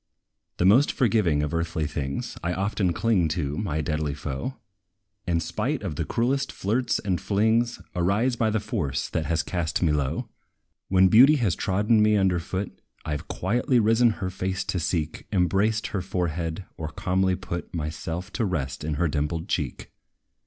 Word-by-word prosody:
The 90 - +1
most 120 +10 +6
forgiving 105 - +2
of 75 - -3
earthly 85 -1 -1
things, 70 -2 -4
I 85 +1 0
often 95 -1 0
cling 100 -3 +2
to 75 -3 -1
my 80 -7 -1
deadly 75 -1 -2
foe; 70 - -4 0.7
And, 85 -2 +1
spite 120 - -2
of 90 -7 -3
the 80 - -2
cruelest 135 - 0
flirts 115 +4 0
and 95 -4 -2
flings, 110 +3 +1 0.2
Arise 100 +8 +1
by 115 -2 +1
the 110 0 +1
force 80 -10 -2
that 80 -2 -2
has 80 0 +1
cast 85 -1 -1
me 80 - +3
low. 70 -3 -1 0.6
When 95 0 +5
beauty 130 +10 +7
has 115 - +1
trodden 105 +3 +2
me 105 0 +4
under 95 -3 +2
foot, 95 +4 -5 0.2
I 75 - -1
've 75 - -7
quietly 120 - +1
risen 115 +2 +4 0.2
her 95 - -2
face 95 0 -2
to 95 -1 -2
seek, 80 -1 -2
Embraced 100 +4 +1
her 100 - 0
forehead, 85 -1 -2
or 80 - -4
calmly 95 +2 0
put 90 -2 -6
Myself 85 +3 -4
to 120 - -1
rest 70 -10 -2
in 75 0 -2
her 85 +3 +1
dimpled 80 +3 -2
cheek. 70 -7 -3
90 Hz, 170 wpm, -25 LUFS, 80-105 Hz, 0.7 s, beauty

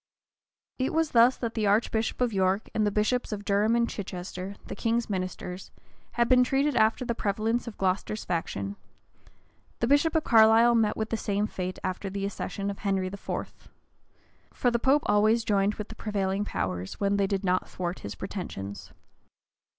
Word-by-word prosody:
It 260 +4 -1
was 320 -1 +1
thus 240 +2 +5
that 230 -2 -3
the 215 -3 0
archbishop 220 +3 +1
of 245 -3 +1
York, 190 +1 +1
and 215 -1 +1
the - - +1
bishops 215 +5 0
of 205 -1 -5
Durham 210 +3 +2
and 235 0 +2
Chichester, 185 -1 -6
the - - -6
king's 230 -1 0
ministers, 185 -1 -4 0.4
had 235 0 +2
been 250 0 +6
treated 275 +2 +1
after 220 +3 +3
the 235 - 0
prevalence 220 +3 -1
of 225 - -7
Glocester's 195 +3 -1
faction: 100 - -3 1.0
the - - +1
bishop 285 +5 +3
of 320 - +3
Carlisle 225 +1 +6
met 220 -2 +2
with 220 0 -3
the 225 - 0
same 205 -1 -1
fate 185 -3 -4
after 185 +1 -3
the 195 +1 -3
accession 200 0 -3
of 200 - -9
Henry 195 -2 0
IV. 200 - -6 0.8
For 245 - +1
the 235 - +1
pope 275 +5 +3
always 215 +3 +3
joined 205 -1 +1
with 210 - -6
the 225 - -9
prevailing 200 -2 -1
powers, 95 - -3
when 200 0 +1
they 200 -1 +2
did 195 0 -1
not 185 -1 0
thwart 175 0 -4
his 100 -1 -7
pretensions. 95 +5 -6
210 Hz, 175 wpm, -27 LUFS, 190-235 Hz, 1.0 s, been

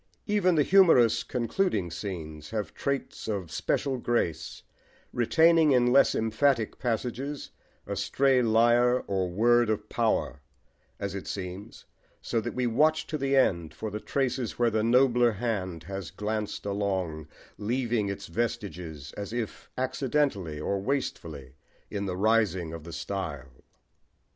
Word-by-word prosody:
Even 200 -4 +2
the 150 - +4
humorous 165 - +5
concluding 120 - -1
scenes 80 -4 -6
have 110 -2 -4
traits 140 -4 -3
of 100 -6 -3
special 135 -2 -1
grace, 85 -10 -2 0.5
retaining 160 +5 +4
in 125 -1 +3
less 140 - +5
emphatic 115 +1 +1
passages 125 +4 -3 0.3
a 100 - -4
stray 130 +6 +2
lire 120 +2 +4
or 95 -2 -2
word 120 +5 +3
of 105 -1 -1
power, 110 -10 0 0.6
as 100 -2 -3
it 100 - -6
seems, 95 +1 -7 0.3
so 115 - -1
that 120 - -5
we 125 -1 0
watch 155 +7 +2
to 155 - -5
the 135 0 +1
end 85 -11 +2
for 110 - -5
the 105 - -4
traces 130 -2 -2
where 120 -1 +2
the 110 0 +1
nobler 120 0 +4
hand 95 -7 -3
has 95 0 -6
glanced 105 0 -4
along, 95 -6 -2 0.3
leaving 115 -1 0
its 100 0 -5
vestiges, 85 -7 -4
as 100 0 -6
if 115 -2 -5
accidentally 130 - -1
or 100 +5 -1
wastefully, 80 - -3 0.4
in 100 -1 -3
the 90 -1 -3
rising 95 -6 +1
of 80 -2 -8
the 85 - -8
style. 80 -7 -5
110 Hz, 140 wpm, -28 LUFS, 95-125 Hz, 0.6 s, humorous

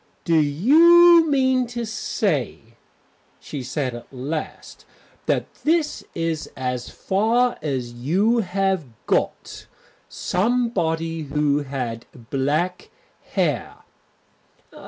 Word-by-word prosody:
"Do 165 -2 +2
you 325 - +6
mean 260 -3 +2
to 240 0 -4
say," 145 - -2 0.6
she 145 - -7
said 130 0 -3
at 120 - -10
last, 140 +5 -6 0.4
"that - - -1
that 315 -1 +1
is 165 -2 -2
as 125 -1 -3
far 230 +5 +1
as 130 -5 -3
you 185 - +1
have 190 -3 0 0.2
got? - - -2 0.4
Somebody 180 -7 -1
who 145 0 +1
had 125 -5 -5 0.2
black 150 +7 -1 0.4
hair?" - - -1
165 Hz, 95 wpm, -22 LUFS, -, 0.6 s, you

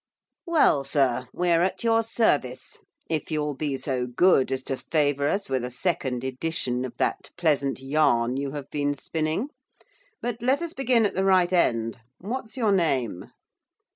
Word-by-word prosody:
'Well, 305 - +4
sir, 130 -3 +1
we 180 0 0
are 165 0 +4
at 185 +5 -1
your 225 -1 +3
service, 145 - 0 0.3
if 160 -2 -2
you 155 -2 -1
will 150 0 -2
be 140 0 -2
so 130 -2 -2
good 135 +1 +3
as 130 0 -2
to 135 - -2
favour 145 -2 0
us 195 0 -1
with 130 -2 -1
a 125 - -3
second 125 -3 -2
edition 130 -2 -2
of 120 -1 -9
that - - -1
pleasant 145 -6 +1
yarn 135 -4 +2
you 140 +1 -2
have 145 -2 -7
been 145 -1 0
spinning. 160 - -2 0.7
But 240 -1 -4
let 265 +7 +1
us 340 -1 -5
begin 245 -4 +2
at 205 - 0
the 190 - 0
right 185 -2 +3
end! 115 -8 +1 0.2
what's 225 +4 -6
your 225 -5 +2
name? 135 - 0
150 Hz, 170 wpm, -25 LUFS, 130-190 Hz, 0.7 s, Well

